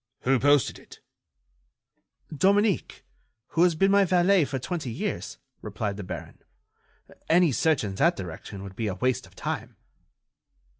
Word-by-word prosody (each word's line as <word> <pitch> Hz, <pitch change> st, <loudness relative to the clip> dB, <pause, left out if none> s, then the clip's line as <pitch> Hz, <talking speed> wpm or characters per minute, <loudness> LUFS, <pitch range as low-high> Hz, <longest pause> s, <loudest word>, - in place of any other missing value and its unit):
"Who 130 Hz, 0 st, +2 dB
posted 145 Hz, -2 st, +3 dB
it?" -, -, -16 dB, 1.4 s
"Dominique, 200 Hz, +4 st, +1 dB, 0.4 s
who 165 Hz, -, 0 dB
has 175 Hz, -2 st, +4 dB
been 195 Hz, +4 st, +3 dB
my 200 Hz, 0 st, +5 dB
valet 185 Hz, -1 st, +3 dB
for 135 Hz, -, -4 dB
twenty 155 Hz, 0 st, -4 dB
years," 60 Hz, -, -4 dB, 0.2 s
replied 100 Hz, -2 st, -4 dB
the 105 Hz, -, -6 dB
baron. 90 Hz, -, -8 dB, 0.9 s
"Any 170 Hz, -1 st, +5 dB
search 155 Hz, +2 st, +1 dB
in 100 Hz, -2 st, -3 dB
that 95 Hz, -, +2 dB
direction 95 Hz, +2 st, -8 dB
would 95 Hz, -1 st, -9 dB
be 110 Hz, +1 st, -2 dB
a 95 Hz, -, -2 dB
waste 130 Hz, +5 st, -1 dB
of -, -, -22 dB
time." -, -, -5 dB
145 Hz, 145 wpm, -26 LUFS, -, 1.4 s, my